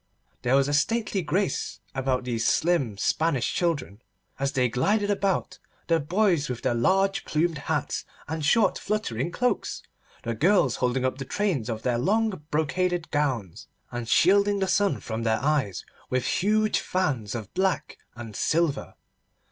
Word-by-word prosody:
There 125 +1 +2
was 135 0 +3
a 145 - -1
stately 210 +6 +1
grace 185 +5 -1
about 130 -1 0
these 120 -2 -2
slim 140 - +1
Spanish 155 +4 +1
children 140 - -1 0.4
as 140 0 -1
they 125 -1 +2
glided 205 - +1
about, 200 -2 -1 0.3
the 165 -1 +2
boys 170 -1 +1
with 125 -2 -5
their - - +2
large 195 +11 +2
plumed 160 0 0
hats 155 -4 -1 0.2
and 160 0 -3
short 195 +6 +3
fluttering 170 - -2
cloaks, 250 +7 -1 0.4
the 115 - -2
girls 145 - +3
holding 125 +1 0
up 130 +1 -1
the - - -3
trains 160 - -1
of 110 -1 -4
their 120 -2 +1
long 220 - +2 0.2
brocaded 170 +3 0
gowns, 130 - -2 0.2
and 120 -1 -4
shielding 200 +3 +4
the 190 -1 0
sun 200 +1 +1
from 110 0 -4
their 110 -1 +1
eyes 140 - 0 0.2
with 130 -1 0
huge 215 +2 +2
fans 135 - -1
of 110 -4 -6
black 190 0 -1 0.2
and 115 -3 -8
silver. 160 +1 0
150 Hz, 155 wpm, -26 LUFS, 125-190 Hz, 0.4 s, shielding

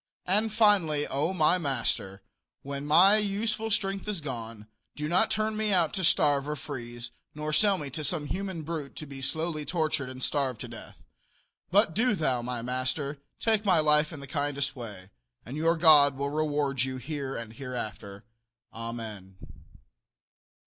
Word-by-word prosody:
And 210 +4 +2
finally, 200 -9 +3
O, 145 +6 0
my 180 0 +3
master, 115 - -2 0.4
when 140 +1 -5
my 185 +7 +7
useful 215 +2 -1
strength 195 -2 -1
is 210 -4 -1
gone, 115 -7 -6 0.3
do 150 0 -3
not 185 +7 +3
turn 215 0 0
me 215 -1 0
out 175 -5 +2
to 190 - -2
starve 145 -3 +3
or 150 - -1
freeze, 120 -4 -7 0.2
nor 150 0 -3
sell 200 +3 +4
me 145 -5 -6
to 155 +4 -4
some 150 0 0
human 185 0 -4
brute 155 -3 -5
to 155 - -7
be 135 -2 -8
slowly 160 +2 -1
tortured 155 -5 -1
and 130 0 -8
starved 135 -5 -1
to - - -5
death, - - -11 0.7
but 190 -1 +4
do 235 +3 +2
thou, 135 -8 0
my 120 -1 -4
master, 130 +3 -2 0.2
take 220 -2 +2
my 190 -5 +4
life 150 0 +4
in 155 -4 -8
the - - -7
kindest 140 0 -1
way, 105 -6 -9 0.3
and 125 - -7
your 165 +2 +2
God 150 -4 +7
will 140 +1 -2
reward 145 -3 0
you 130 0 -1
here 135 0 -4
and 115 -1 -6
hereafter. 110 -5 -6 0.5
Amen. 110 -5 -7
150 Hz, 165 wpm, -28 LUFS, 130-175 Hz, 0.7 s, my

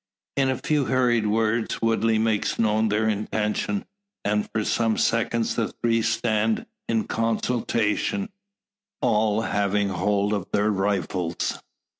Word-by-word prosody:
In 135 -1 +2
a 130 - 0
few 150 -3 0
hurried 120 -4 +2
words 110 +1 0
Woodley 115 0 +2
makes 110 -1 0
known 110 0 +2
their 110 +1 +1
intention; 110 - -1 0.4
and 105 0 0
for 110 -1 -1
some 115 -2 +1
seconds 115 0 +1
the 115 -2 0
three 115 -1 0
stand 110 -1 0 0.2
in 115 -1 +2
consultation, 115 - 0 0.7
all 110 0 +2
having 100 -1 0
hold 100 +2 0
of 100 -2 -3
their 105 +1 +2
rifles. 95 -4 -1
110 Hz, 125 wpm, -24 LUFS, 105-115 Hz, 0.7 s, In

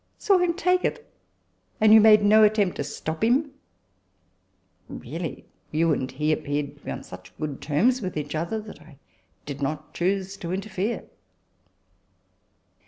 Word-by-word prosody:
" - - -44
Saw 390 -2 +3
him 350 -1 +1
take 365 0 +1
it! 465 - -2 0.7
and 215 0 +6
you 220 - +9
made 215 -1 +7
no 215 +1 +6
attempt 210 -3 +3
to - - -2
stop 160 +4 -5
him? 270 +6 +2 0.5
" 95 -3 -44 0.3
" 95 0 -42
Really, 155 +1 -6 0.2
you 160 +1 +2
and 130 -2 -2
he 150 +3 -1
appeared 145 -1 -2
to - - -29
be - - -7
on - - -5
such - - -13
good 150 -3 -5
terms 225 - +2
with 185 -5 -4
each 150 -1 -4
other, 170 +8 -2
that 210 -7 -12
I 155 -2 -17 0.5
did 145 0 -7
not 150 +2 -4
choose 190 +2 -1
to 170 -2 -6
interfere." 200 +3 -3
175 Hz, 170 wpm, -25 LUFS, 150-215 Hz, 0.7 s, you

